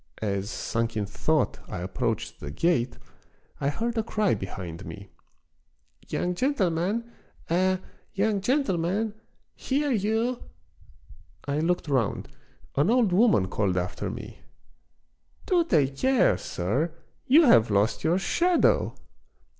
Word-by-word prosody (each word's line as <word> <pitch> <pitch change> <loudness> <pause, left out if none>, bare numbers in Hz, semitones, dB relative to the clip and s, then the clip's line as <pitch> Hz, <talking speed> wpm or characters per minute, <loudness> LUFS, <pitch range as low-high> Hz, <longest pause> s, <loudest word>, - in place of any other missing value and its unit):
As, 100 -1 -2
sunk 115 -1 -2
in 105 - 0
thought, 145 +8 0
I 90 - -5
approached 95 +1 -3
the 75 - -6
gate 125 - 0 0.6
I 140 - +1
heard 230 +10 -2
a - - +3
cry 215 -2 +1
behind 95 -3 -6
me. 100 0 -10 1.0
"Young 180 - -1
gentleman! 210 - 0 0.4
eh! 185 +2 +3 0.3
young 200 0 0
gentleman! 205 - 0 0.4
hear 285 +2 -1
you! 225 +3 0 0.5
" - - -25
I 145 - 0
looked 175 +1 0
round. 130 -7 0 0.5
An 145 +7 +3
old 235 -6 +3
woman 190 - +4
called 95 -2 0
after 90 0 -2
me: - - -8 0.3
— - - -44
" - - -35
Do 355 -3 +3
take 140 - +1
care, 265 - +3
sir, 135 - -2 0.3
you 300 +6 +7
have 115 - +6
lost 105 +2 +1
your 170 +3 +3
shadow 345 - +2
175 Hz, 130 wpm, -26 LUFS, -, 1.0 s, you